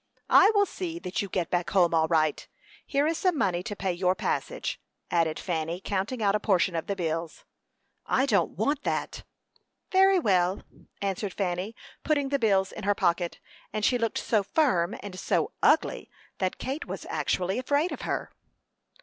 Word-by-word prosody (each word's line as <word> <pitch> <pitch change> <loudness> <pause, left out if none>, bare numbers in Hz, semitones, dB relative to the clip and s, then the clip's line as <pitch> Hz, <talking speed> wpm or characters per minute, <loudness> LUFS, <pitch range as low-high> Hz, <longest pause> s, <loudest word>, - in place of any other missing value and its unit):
"I 400 - +8
will 405 0 +5
see 350 -3 -5
that 220 - -3
you 200 - -5
get 180 -2 -2
back 175 -1 0
home 175 -4 +3
all 160 -1 +3
right. 155 -2 +1 0.4
Here 285 0 +1
is 320 +1 0
some 365 -4 +1
money 180 -7 +1
to 205 +3 -5
pay 190 -2 -1
your 180 +1 +1
passage," - - -3 0.3
added 165 -2 +1
Fanny, 165 -1 -2
counting 205 +5 -2
out 200 -1 +3
a 210 - +2
portion 190 -3 +2
of 165 - -3
the 200 - -1
bills. 165 -2 -3 0.6
"I 265 - +2
don't 200 -12 +1
want 280 +8 0
that." - - -2 0.7
"Very 385 0 +5
well," 190 - +2 0.4
answered 195 0 -2
Fanny, 190 +3 -2 0.3
putting 285 -3 +1
the 280 0 +1
bills 195 -5 +2
in 220 - -8
her 205 +1 +2
pocket; 175 -2 0 0.3
and 215 0 -1
she 245 - +3
looked 230 -1 -1
so 215 -3 +1
firm 195 - +1
and 185 -2 -7
so - - 0
"ugly" - - +2 0.3
that 185 -1 -1
Kate 275 +5 -4
was - - -6
actually 185 +5 -1
afraid 285 +6 +1
of - - -5
her. - - -3
195 Hz, 175 wpm, -27 LUFS, 175-265 Hz, 0.7 s, I